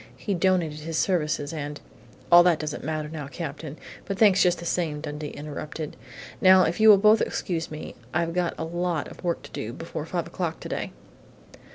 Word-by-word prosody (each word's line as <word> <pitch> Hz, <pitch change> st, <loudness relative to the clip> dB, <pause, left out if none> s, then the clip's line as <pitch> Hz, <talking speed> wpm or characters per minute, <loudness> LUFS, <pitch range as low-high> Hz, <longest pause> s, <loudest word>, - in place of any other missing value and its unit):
He 205 Hz, -, -2 dB
donated 175 Hz, -4 st, +1 dB
his 160 Hz, +1 st, -4 dB
services 150 Hz, -5 st, 0 dB
and 145 Hz, -1 st, -5 dB, 0.3 s
" -, -, -24 dB
"All 175 Hz, 0 st, +10 dB
that 175 Hz, -2 st, +4 dB
doesn't 150 Hz, -1 st, -5 dB
matter 155 Hz, 0 st, -2 dB
now, 150 Hz, -2 st, -6 dB
Captain, 155 Hz, 0 st, -6 dB, 0.3 s
but 195 Hz, -, -3 dB
thanks 200 Hz, -3 st, +5 dB
just 180 Hz, -1 st, +4 dB
the 170 Hz, -, -8 dB
same," 165 Hz, -4 st, -1 dB
Dundee 150 Hz, 0 st, -5 dB
interrupted. 150 Hz, +1 st, -6 dB, 0.5 s
"Now 185 Hz, 0 st, +7 dB
if 170 Hz, +3 st, -1 dB
you 220 Hz, 0 st, +7 dB
will 205 Hz, -, +10 dB
both 215 Hz, +2 st, +5 dB
excuse 165 Hz, -4 st, -2 dB
me, 155 Hz, 0 st, -7 dB, 0.2 s
I've 165 Hz, +2 st, 0 dB
got 180 Hz, -1 st, 0 dB
a -, -, -3 dB
lot 175 Hz, -1 st, -2 dB
of -, -, -13 dB
work 170 Hz, -1 st, -1 dB
to -, -, -12 dB
do 110 Hz, +2 st, -5 dB
before 160 Hz, +1 st, -6 dB
five 170 Hz, -1 st, -2 dB
o'clock 170 Hz, -1 st, -4 dB
today!" -, -, -4 dB
165 Hz, 195 wpm, -26 LUFS, 150-180 Hz, 0.5 s, All